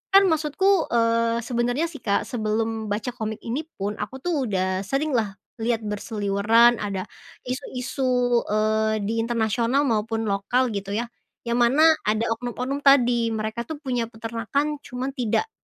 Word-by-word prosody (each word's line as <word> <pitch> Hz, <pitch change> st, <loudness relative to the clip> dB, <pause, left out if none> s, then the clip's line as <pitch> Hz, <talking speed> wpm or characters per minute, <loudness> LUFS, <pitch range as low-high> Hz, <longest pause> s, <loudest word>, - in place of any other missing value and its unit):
kan 395 Hz, -, +9 dB
maksudku, 320 Hz, +4 st, +2 dB
eee, 230 Hz, 0 st, +2 dB
sebenarnya 245 Hz, +5 st, 0 dB
sih, 295 Hz, -, -9 dB
Kak, 200 Hz, -2 st, 0 dB
sebelum 220 Hz, -1 st, -2 dB
baca 210 Hz, +4 st, -2 dB
komik 220 Hz, -3 st, -5 dB
ini 275 Hz, +7 st, -3 dB
pun 205 Hz, +2 st, -4 dB
aku -, -, -4 dB
tuh 310 Hz, -8 st, 0 dB
udah 185 Hz, -2 st, 0 dB
sering 285 Hz, +6 st, 0 dB
lah 220 Hz, -6 st, 0 dB, 0.2 s
lihat 230 Hz, 0 st, 0 dB
berseliweran 210 Hz, +2 st, +2 dB
ada 200 Hz, -3 st, -3 dB, 0.4 s
isu-isu, 255 Hz, +1 st, -4 dB, 0.4 s
eee, 215 Hz, 0 st, +1 dB
di 220 Hz, +3 st, -2 dB
internasional 230 Hz, +3 st, +1 dB
maupun 225 Hz, 0 st, 0 dB
lokal 240 Hz, +6 st, +1 dB
gitu 200 Hz, -1 st, -4 dB
ya, 230 Hz, +3 st, -2 dB, 0.4 s
yang 235 Hz, -, +1 dB
mana 310 Hz, +7 st, +5 dB
ada 220 Hz, +2 st, +1 dB
oknum-oknum 250 Hz, +3 st, -4 dB
tadi. 240 Hz, -4 st, +4 dB
Mereka 220 Hz, +2 st, -3 dB
tuh 300 Hz, +1 st, -7 dB
punya 250 Hz, -5 st, -1 dB
peternakan 230 Hz, +6 st, -2 dB
cuman 250 Hz, +2 st, -4 dB
tidak 250 Hz, -, 0 dB
230 Hz, 145 wpm, -24 LUFS, 215-255 Hz, 0.4 s, kan